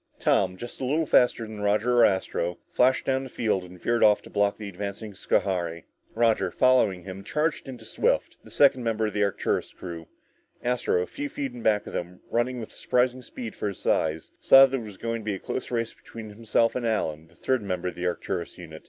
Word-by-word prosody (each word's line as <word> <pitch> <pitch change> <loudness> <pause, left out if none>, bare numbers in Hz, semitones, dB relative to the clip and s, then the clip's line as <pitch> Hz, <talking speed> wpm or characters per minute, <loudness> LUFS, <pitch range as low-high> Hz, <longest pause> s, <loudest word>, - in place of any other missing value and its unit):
Tom, 95 -2 +2
just 120 +6 -9
a - - -2
little 150 +5 +1
faster 125 -4 +3
than 110 -1 -8
Roger 105 +4 +2
or 115 - +8
Astro, 90 -2 0
flashed 130 +1 +3
down 135 0 +1
the 135 - -8
field 105 -6 0
and 90 0 -12
veered 120 +4 +1
off 105 -1 +6
to - - -13
block 100 0 +1
the 105 - -7
advancing 100 +2 -6
Schohari. 85 -3 -1 0.3
Roger, 115 -1 +2
following 125 -9 +3
him, 95 +1 -8
charged 150 +7 -1
into 120 -4 -9
Swift, - - 0
the - - -14
second 135 -3 +4
member 110 -1 0
of 105 - -2
the 105 - +1
Arcturus 100 -2 -1
crew. 85 -3 -8 0.6
Astro, 120 -7 +1
a - - -4
few 145 +9 -5
feet 135 -3 -4
in 120 - -8
back 105 -2 +2
of - - -9
them, 90 +1 -5
running 125 +1 0
with 110 - -7
surprising 125 +1 0
speed 115 -2 -8
for - - -3
his 100 - -4
size, 80 0 0
saw 135 0 +8
that 135 0 -2
it - - -7
was 105 -3 -10
going 115 0 -3
to - - -13
be 105 -2 -1
a - - -7
close 130 - -4
race 115 -2 -2
between 110 -2 -10
himself 115 +1 +1
and 125 -2 -1
Allen, 80 -8 -1
the 85 - -24
third 130 +7 0
member 90 -3 -2
of - - -8
the 90 +1 -3
Arcturus 85 -1 -3
unit. 80 -3 -10
110 Hz, 220 wpm, -26 LUFS, 95-125 Hz, 0.6 s, or